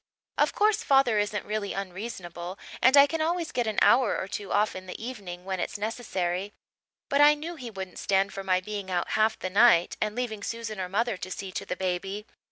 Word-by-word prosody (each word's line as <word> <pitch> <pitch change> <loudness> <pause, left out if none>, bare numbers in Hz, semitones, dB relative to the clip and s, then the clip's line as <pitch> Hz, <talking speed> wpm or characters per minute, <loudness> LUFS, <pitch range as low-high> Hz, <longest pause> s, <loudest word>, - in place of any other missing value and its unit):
Of - - +2
course 430 +1 +3
father 270 - +4
isn't 205 0 -1
really 210 -1 -2
unreasonable 185 -2 -6 0.2
and 260 +3 +6
I 280 - +10
can 320 +2 -2
always 335 +1 -1
get 245 -2 -1
an 215 - -2
hour 250 -3 +4
or - - -3
two 200 0 -5
off 210 +1 +2
in 185 0 -8
the 180 - -7
evening 200 -7 -7
when 190 -1 -3
it's - - -3
necessary; 200 -3 -2 0.5
but 280 +1 +2
I 295 +1 +8
knew 320 +4 -6
he 255 -6 -7
wouldn't 190 -3 -7
stand 195 0 +1
for 195 - -5
my 185 -1 +2
being 200 0 -5
out 180 -1 -1
half 220 +1 +2
the 185 - -4
night 200 -4 +5
and 215 0 -1
leaving 235 -4 -3
Susan 220 -2 -4
or 180 - -4
mother 225 +2 0
to 185 - -6
see 190 0 -5
to - - -5
the - - -2
baby. 190 +3 -3
205 Hz, 215 wpm, -27 LUFS, 185-240 Hz, 0.5 s, I